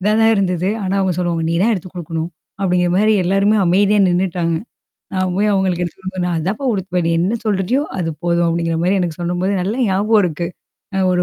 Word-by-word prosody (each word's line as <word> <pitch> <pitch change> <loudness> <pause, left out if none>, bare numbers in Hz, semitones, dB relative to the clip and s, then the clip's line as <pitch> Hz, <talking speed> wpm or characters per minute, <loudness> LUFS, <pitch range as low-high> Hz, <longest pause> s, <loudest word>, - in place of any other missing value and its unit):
இதான் 215 +3 +2
தான் 225 0 +5
இருந்தது. 185 -2 0
ஆனா 190 0 -1
அவங்க 190 -1 +1
சொல்லுவாங்க 170 -2 -1
"நீ - - 0
தான் 230 +3 +3
எடுத்து 185 -2 -6
குடுக்கணும்." 165 -1 -4 0.3
அப்படிங்கிற 180 -2 +1
மாரி 215 +2 +4
எல்லாருமே 195 +4 +3
அமைதியா 200 +4 +3
நின்னுட்டாங்க. 175 -2 0 0.6
நான் 185 -1 0
போய் 210 +1 +2
அவங்களுக்கு 185 -2 +1
எடுத்து 170 - -9
குடுக்கணும். 185 -1 -3
"நான் 175 -2 -1
அதான்ப்பா 195 - -2
உடுத்துவன். 180 -3 -2
நீ - - +2
என்ன 195 +7 0
சொல்றயோ? 210 +6 +1 0.2
அது 165 -2 -1
போதும்." 170 0 +2
அப்டிங்கிற 165 0 -1
மாரி 190 +3 +2
எனக்கு 170 -2 -3
சொல்லும்போது, 175 +3 -1
நல்ல 195 +4 -1
ஞாபகம் 205 +3 +3
இருக்கு. 170 0 -2 0.5
அ - - +1
ஒரு 180 0 +2
185 Hz, 200 wpm, -18 LUFS, 175-195 Hz, 0.6 s, தான்